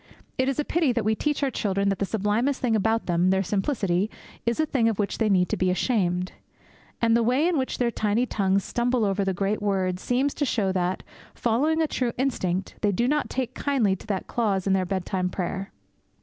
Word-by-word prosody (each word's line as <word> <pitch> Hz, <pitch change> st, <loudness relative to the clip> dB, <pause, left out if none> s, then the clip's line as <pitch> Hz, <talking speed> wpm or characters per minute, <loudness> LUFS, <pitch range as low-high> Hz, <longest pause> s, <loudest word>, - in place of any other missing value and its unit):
It 260 Hz, +1 st, +2 dB
is 275 Hz, -, -2 dB
a 295 Hz, -, +1 dB
pity 330 Hz, -6 st, +2 dB
that 230 Hz, -3 st, -1 dB
we 220 Hz, -, +3 dB
teach 295 Hz, +6 st, -1 dB
our 270 Hz, -, +1 dB
children 200 Hz, -3 st, 0 dB
that 195 Hz, -, -1 dB
the 200 Hz, -, 0 dB
sublimest 220 Hz, +7 st, 0 dB
thing 235 Hz, -3 st, +1 dB
about 220 Hz, +2 st, +1 dB
them 175 Hz, +1 st, +2 dB
their 190 Hz, 0 st, +2 dB
simplicity 195 Hz, -1 st, 0 dB, 0.4 s
is 235 Hz, +3 st, +1 dB
a 315 Hz, -, +3 dB
thing 245 Hz, -6 st, +2 dB
of 220 Hz, -, -2 dB
which 205 Hz, -1 st, -2 dB
they 220 Hz, -2 st, +2 dB
need 180 Hz, -2 st, +3 dB
to -, -, -1 dB
be 185 Hz, -, +1 dB
ashamed. 180 Hz, -2 st, 0 dB, 0.7 s
And 230 Hz, 0 st, +4 dB
the 235 Hz, -, +3 dB
way 255 Hz, +8 st, +2 dB
in 355 Hz, -, +1 dB
which 260 Hz, -3 st, -1 dB
their 240 Hz, -1 st, +1 dB
tiny 220 Hz, +2 st, +1 dB
tongues 195 Hz, -4 st, +1 dB
stumble 240 Hz, -1 st, 0 dB
over 200 Hz, 0 st, 0 dB
the 190 Hz, -1 st, -1 dB
great 200 Hz, +3 st, -1 dB
word 190 Hz, -3 st, 0 dB
seems 260 Hz, +7 st, 0 dB
to 290 Hz, -, -2 dB
show 210 Hz, -8 st, +1 dB
that, 185 Hz, 0 st, -1 dB, 0.3 s
following 295 Hz, +8 st, +1 dB
a -, -, +1 dB
true 250 Hz, -5 st, -1 dB
instinct, 190 Hz, -8 st, -1 dB
they 205 Hz, -, +2 dB
do 235 Hz, +6 st, +1 dB
not 300 Hz, +2 st, 0 dB
take 260 Hz, -2 st, -2 dB
kindly 245 Hz, -9 st, +1 dB
to -, -, -15 dB
that 200 Hz, -3 st, -2 dB
clause 200 Hz, -6 st, 0 dB
in 195 Hz, -, +2 dB
their 190 Hz, -1 st, +2 dB
bedtime 185 Hz, 0 st, -1 dB
prayer. 190 Hz, +1 st, -4 dB
215 Hz, 220 wpm, -25 LUFS, 190-250 Hz, 0.7 s, And